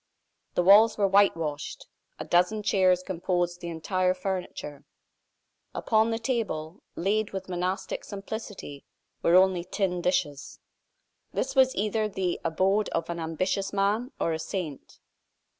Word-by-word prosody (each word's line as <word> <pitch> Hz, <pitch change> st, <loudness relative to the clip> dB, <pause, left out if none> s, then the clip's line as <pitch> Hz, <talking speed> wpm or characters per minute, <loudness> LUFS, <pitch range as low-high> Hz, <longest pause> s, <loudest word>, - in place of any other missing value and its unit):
The 180 Hz, -, +2 dB
walls 210 Hz, +4 st, +7 dB
were 200 Hz, -2 st, +3 dB
whitewashed; 165 Hz, -7 st, +1 dB, 0.3 s
a -, -, -6 dB
dozen 180 Hz, +5 st, +2 dB
chairs 185 Hz, -3 st, +3 dB
composed 175 Hz, -1 st, -1 dB
the 175 Hz, -, -5 dB
entire 185 Hz, +3 st, 0 dB
furniture; 180 Hz, -6 st, -5 dB, 0.9 s
upon 220 Hz, 0 st, +2 dB
the 225 Hz, -, 0 dB
table, 215 Hz, -9 st, -3 dB
laid 205 Hz, +4 st, 0 dB
with 190 Hz, -1 st, -5 dB
monastic 185 Hz, +2 st, -3 dB
simplicity, 200 Hz, -7 st, -7 dB, 0.4 s
were 170 Hz, -, +4 dB
only 185 Hz, -1 st, +4 dB
tin 180 Hz, -1 st, -1 dB
dishes. 145 Hz, -6 st, -1 dB, 0.8 s
This -, -, -2 dB
was 260 Hz, -1 st, +4 dB
either 215 Hz, +2 st, 0 dB
the 185 Hz, -3 st, -2 dB
abode 190 Hz, +5 st, +1 dB
of 165 Hz, +1 st, -2 dB
an 170 Hz, -, -4 dB
ambitious 185 Hz, +4 st, -1 dB
man 205 Hz, +6 st, 0 dB
or 165 Hz, -, 0 dB
a 160 Hz, -, -3 dB
saint. 160 Hz, -4 st, -5 dB
185 Hz, 130 wpm, -27 LUFS, 170-205 Hz, 0.9 s, walls